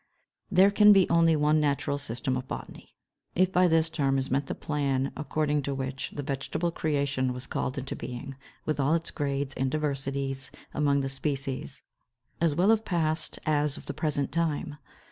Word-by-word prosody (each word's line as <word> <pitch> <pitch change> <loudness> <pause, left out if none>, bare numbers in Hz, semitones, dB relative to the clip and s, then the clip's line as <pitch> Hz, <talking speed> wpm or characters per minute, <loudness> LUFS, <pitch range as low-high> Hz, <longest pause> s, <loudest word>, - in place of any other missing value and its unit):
551. - - -5
There 200 - -1
can 210 -1 +8
be 195 -2 +4
only 165 -1 +5
one 150 +1 +3
natural 145 -1 0
system 130 -1 -2
of 130 0 -4
botany, - - -8 0.4
if 185 +1 +3
by 180 0 +4
this 165 -1 +3
term 135 -4 +1
is 135 0 -2
meant 135 +1 +1
the - - -3
plan 140 -3 -1
according 150 0 0
to 140 0 -3
which 135 0 -3
the 145 - -3
vegetable 145 +5 -2
creation 140 -5 0
was 125 +1 -6
called 130 - -3
into 135 0 -4
being, 135 +2 -6 0.3
with 155 -1 -1
all 140 +4 +3
its 165 -1 -3
grades 140 -2 -2
and 135 0 -1
diversities 135 -2 -2 0.2
among 140 -1 +2
the 135 - -1
species, 135 -1 -3 0.6
as 165 -4 +2
well 190 +6 +4
of 220 -1 +3
past 165 -5 0
as 150 -2 +1
of - - -11
the 140 - -4
present 145 -2 -1
time. 160 -3 -1
145 Hz, 185 wpm, -28 LUFS, 135-155 Hz, 0.6 s, can